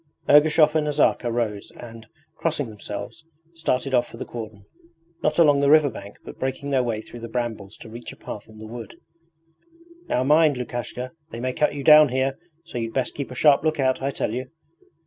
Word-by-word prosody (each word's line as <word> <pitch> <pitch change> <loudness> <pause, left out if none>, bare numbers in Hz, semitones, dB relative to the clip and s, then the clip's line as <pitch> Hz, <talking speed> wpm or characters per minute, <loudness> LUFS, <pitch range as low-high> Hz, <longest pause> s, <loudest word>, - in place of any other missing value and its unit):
Ergushov 150 +1 +6
and 155 -1 +1
Nazarka 145 -4 +2
rose 110 -4 -2
and, 115 -2 -11 0.3
crossing 150 -6 -2
themselves, 105 +4 -8 0.3
started 135 -5 -1
off 120 -1 +3
for - - -12
the - - -5
cordon 110 -4 -8 0.6
not 150 0 0
along 150 -4 +5
the 140 0 +3
riverbank 140 -10 +2
but - - -10
breaking 135 +2 -3
their 135 -2 +3
way 115 -3 -2
through 120 - -11
the 115 - -7
brambles 110 -4 -4
to - - -12
reach 115 +2 -9
a - - -12
path 105 +1 -9
in 110 - -15
the 110 - -9
wood. 115 -1 -9 1.1
'Now 125 - +1
mind, 150 0 +4
Lukashka 125 +1 -5 0.2
they 115 - -7
may 130 +1 -2
cut 150 +1 +1
you 140 - -5
down 150 -1 +8
here, 130 +1 -1 0.3
so 125 - -6
you'd 115 -1 -4
best 130 -2 -1
keep 140 - -5
a 125 - -8
sharp 145 +2 +5
look 155 -1 0
out, 130 -1 +1
I 135 - 0
tell 120 -5 -2
you!' 130 +1 -4
130 Hz, 200 wpm, -24 LUFS, 115-145 Hz, 1.1 s, down